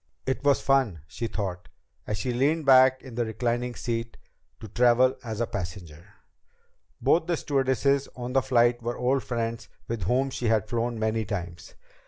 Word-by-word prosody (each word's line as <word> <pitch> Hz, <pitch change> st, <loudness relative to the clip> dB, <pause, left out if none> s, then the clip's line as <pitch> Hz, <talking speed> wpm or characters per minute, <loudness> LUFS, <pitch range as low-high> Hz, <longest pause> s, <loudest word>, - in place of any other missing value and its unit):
It 130 Hz, +1 st, -2 dB
was 140 Hz, -1 st, +4 dB
fun, 130 Hz, -, +1 dB
she 115 Hz, +9 st, -5 dB
thought, 90 Hz, -5 st, -5 dB, 0.4 s
as 105 Hz, -, -2 dB
she 125 Hz, +4 st, -2 dB
leaned 145 Hz, +5 st, +1 dB
back 130 Hz, -1 st, +6 dB
in 130 Hz, -, -10 dB
the 120 Hz, +1 st, 0 dB
reclining 120 Hz, +2 st, -2 dB
seat, 115 Hz, -1 st, -4 dB, 0.4 s
to 110 Hz, -, -9 dB
travel 125 Hz, +4 st, +3 dB
as 110 Hz, -2 st, -5 dB
a 120 Hz, -, +1 dB
passenger. 90 Hz, -7 st, -7 dB, 0.8 s
Both 165 Hz, 0 st, +2 dB
the 170 Hz, -2 st, 0 dB
stewardesses 140 Hz, 0 st, +1 dB
on 125 Hz, 0 st, -5 dB
the 135 Hz, -, +4 dB
flight 120 Hz, -2 st, +2 dB
were 120 Hz, +1 st, -3 dB
old 130 Hz, +2 st, +1 dB
friends 115 Hz, -2 st, -3 dB, 0.2 s
with 115 Hz, -5 st, -3 dB
whom 130 Hz, +6 st, +1 dB
she 125 Hz, -, -3 dB
had 110 Hz, -1 st, +2 dB
flown 120 Hz, +1 st, -2 dB
many 110 Hz, 0 st, 0 dB
times. 90 Hz, -4 st, -6 dB
120 Hz, 170 wpm, -26 LUFS, 110-130 Hz, 0.8 s, back